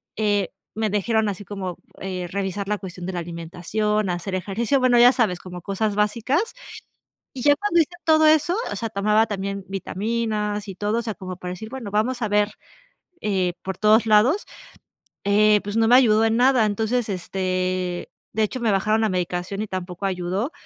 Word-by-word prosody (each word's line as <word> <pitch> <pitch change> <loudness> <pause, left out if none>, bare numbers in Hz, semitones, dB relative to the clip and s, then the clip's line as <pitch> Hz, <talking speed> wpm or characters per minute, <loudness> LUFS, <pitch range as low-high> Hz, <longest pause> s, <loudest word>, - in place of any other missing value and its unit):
Eh, 205 -3 +1 0.3
me 220 -1 0
dijeron 215 +1 +1
así 200 0 -6
como, 185 -3 -5 0.2
eh, 185 -2 -4
revisar 195 +1 -3
la 210 0 0
cuestión 180 -2 -8
de 190 - -4
la 175 - -2
alimentación, 175 +5 -2
hacer 175 +2 -3
ejercicio, 210 +8 0
bueno, 250 -2 +4
ya 245 +2 +8
sabes, 210 -9 +1
como 180 -1 -9
cosas 200 +2 -1
básicas. 235 - 0 0.8
Y 250 - -4
ya 290 +2 +6
cuando 410 -2 +1
hice 320 - +1
todo 315 -1 +5
eso 310 +3 +4 0.2
o - - -3
sea, 230 - -3
tomaba 210 +2 +2
también 200 -1 -4
vitaminas 210 +1 -2
y 195 - -5
todo, 210 +4 -1
o - - -1
sea, 225 -2 -4
como 185 -2 -7
para 180 -1 -6
decir, 200 +4 -7
bueno, 245 -6 -6
vamos 240 +4 0
a 215 - +1
ver 205 0 +2 0.7
eh 190 -4 0
por 190 -1 -4
todos 215 +2 +4
lados, 225 - +4 0.8
eh, 210 +1 +4
pues, 205 +1 -5
no 225 0 +4
me 245 - +6
ayudó 225 -4 +5
en 225 +1 +2
nada. 250 -2 +4
Entonces, 220 +3 -1
este, 185 -1 -2 0.2
de 220 - +1
hecho, 215 +4 -2
me 230 -3 +1
bajaron 215 +3 +2
la 220 - +2
medicación 180 +2 -2
y - - -5
tampoco 185 0 -5
ayudó. 190 - -2
210 Hz, 185 wpm, -23 LUFS, 185-225 Hz, 0.8 s, ya